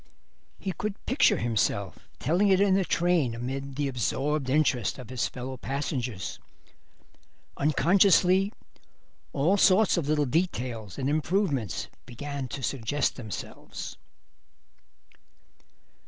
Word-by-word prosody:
He 195 - -3
could 210 +2 -5
picture 260 +3 +3
himself 100 -6 -1
telling 175 +9 +2
it 190 -1 +4
in 200 -1 +4
the 195 0 +3
train 170 -9 +1
amid 135 +3 -5
the 145 0 0
absorbed 135 +3 -1
interest 135 -4 +2
of 125 -2 -9
his 125 -2 0
fellow 130 +1 -6
passengers. 125 - -3 1.2
Unconsciously 185 +5 +4 0.8
all 160 +8 +2
sorts 195 +1 +5
of 160 -5 -1
little 150 -1 +2
details 125 - -2
and 135 - -1
improvements 150 - 0 0.2
began 140 +2 -5
to 130 +3 -6
suggest 135 +3 -1
themselves. 110 -6 -7
140 Hz, 110 wpm, -27 LUFS, 125-180 Hz, 1.2 s, sorts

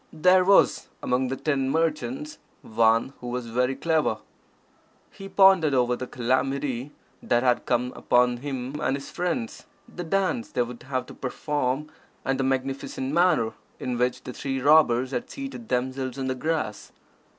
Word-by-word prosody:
There 180 +4 +4
was, 195 +1 +4 0.2
among 125 +1 +1
the 135 - -2
ten 135 -2 0
merchants, 150 -1 -1 0.2
one 115 +3 +2
who 125 - -8
was 125 0 -3
very 125 +3 0
clever. 160 +2 +1 0.9
He 195 -1 -10
pondered 190 -8 +5
over 125 -1 +2
the 130 +1 -6
calamity 130 +1 -1 0.3
that 120 0 +1
had 125 -1 +1
come 125 +1 0
upon 125 0 +2
him 135 +1 -5
and 135 - +1
his 140 - -10
friends, 180 +7 -3 0.2
the 180 -7 -7
dance 195 +7 0
they 125 - 0
would 120 0 -9
have 130 0 -3
to - - -11
perform, 145 +1 -2 0.3
and 135 0 0
the - - +1
magnificent 135 +1 -2
manner 170 -10 +3 0.3
in 125 - -3
which 125 +1 0
the 125 - -7
three 135 0 -3
robbers 130 -3 +4
had 125 -2 -3
seated 270 -4 -7
themselves 130 +1 -2
on 135 - -3
the 130 - 0
grass. 150 -5 -3
135 Hz, 160 wpm, -25 LUFS, 125-155 Hz, 0.9 s, pondered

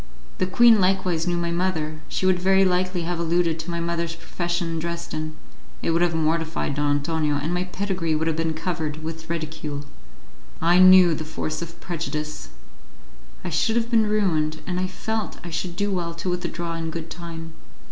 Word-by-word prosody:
The 185 - +2
queen 225 +2 +6
likewise 185 -3 +1
knew 175 -1 +1
my 170 0 -1
mother; 160 -3 -1
she - - -1
would 185 -1 +4
very 190 +1 +4
likely 185 -1 +1
have 170 0 -2
alluded 170 -1 +1
to 160 +2 -6
my 170 0 -2
mother's 170 0 -2
profession 175 0 -2
in 165 - -2
Dresden; 160 -2 -4 0.5
it - - +2
would 165 +1 +2
have 175 -2 +2
mortified 160 -1 0
Don 145 0 +2
Antonio, 150 0 0
and 150 +4 -1
my 180 +1 0
pedigree 185 -4 -1
would 155 +1 0
have 165 -1 +1
been 160 0 -1
covered 155 -2 -3
with 160 +1 -6
ridicule. 155 -3 -4 0.7
I 175 +2 +4
knew 185 -2 +8
the 155 - -3
force 155 0 -4
of 170 0 -7
prejudice! 155 - -4 0.9
I - - -4
should 225 - +2
have 235 0 0
been 220 -2 +4
ruined, 160 -7 +1
and 180 -1 -2
I 185 - 0
felt 220 +4 -3
I 175 - -7
should 170 +1 -3
do 205 +2 0
well 170 -3 -2
to 180 +2 -2
withdraw 175 -1 -3
in 165 -1 -3
good 165 0 -6
time. 165 -1 -7
170 Hz, 190 wpm, -24 LUFS, 160-180 Hz, 0.9 s, knew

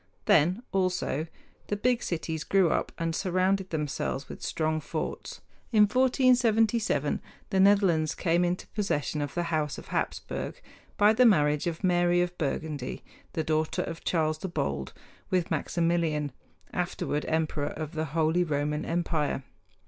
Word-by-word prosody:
Then, 175 +9 +4
also, 185 -5 0 0.4
the 205 - -1
big 245 +3 +1
cities 160 -2 -3
grew 190 -4 +3
up - - 0
and 165 -1 -1
surrounded 190 +1 +1
themselves 145 -3 -2
with - - -9
strong 155 0 -1
forts. - - -5 0.3
In 215 -3 +6
1477 230 - +3 0.3
the 190 - +2
Netherlands 190 -6 +4
came 175 0 +2
into 175 +1 -1
possession 155 -8 -1
of 145 -1 -4
the 175 - 0
House 150 -3 0
of - - -11
Hapsburg - - -3 0.4
by 210 +1 +6
the 250 +3 +4
marriage 150 -6 +3
of 170 +3 -4
Mary 175 -1 +3
of 175 0 0
Burgundy, 145 -3 -3 0.3
the 160 - -1
daughter 155 0 0
of 165 0 -7
Charles 155 -2 0
the 190 - -4
Bold, 70 - -2 0.4
with 180 -2 0
Maximilian, 165 -4 0 0.4
afterward 175 -4 -2
emperor 155 -2 0
of 155 -1 -5
the 160 -2 -2
Holy 160 +3 +1
Roman 150 -1 -1
Empire. 165 -5 -1
165 Hz, 140 wpm, -28 LUFS, 155-190 Hz, 0.4 s, In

